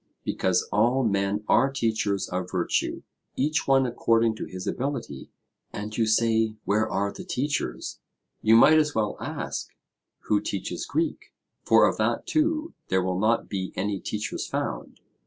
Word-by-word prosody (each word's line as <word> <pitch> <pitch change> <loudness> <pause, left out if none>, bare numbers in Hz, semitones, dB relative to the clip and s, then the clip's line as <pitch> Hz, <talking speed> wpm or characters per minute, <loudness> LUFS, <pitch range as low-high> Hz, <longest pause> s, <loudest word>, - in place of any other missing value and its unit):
Because 95 -1 +1
all 120 +6 +3
men 100 -1 0
are 135 +5 +4
teachers 110 -6 0
of 90 0 -3
virtue, 90 -2 -1 0.3
each 150 +4 0
one 135 -1 +4
according 115 -2 +2
to - - -4
his 95 0 -7
ability; 130 - -4 0.4
and 105 +1 -6
you 115 -2 +1
say 110 0 +2
Where 105 +2 +1
are 100 +1 0
the - - -8
teachers? 145 +3 -3 0.4
You 110 +1 +5
might 155 +7 +7
as 150 -1 0
well 105 -2 0
ask, - - -4 0.5
Who 105 -1 +1
teaches 95 -4 -4
Greek? 325 0 -2 0.3
For - - +5
of - - -1
that - - 0
too 315 +1 0
there 95 -1 +1
will 90 0 -1
not 110 +3 +2
be 95 -2 -4
any 100 +1 -1
teachers 105 +3 -4
found. - - -4
110 Hz, 155 wpm, -26 LUFS, 100-130 Hz, 0.5 s, might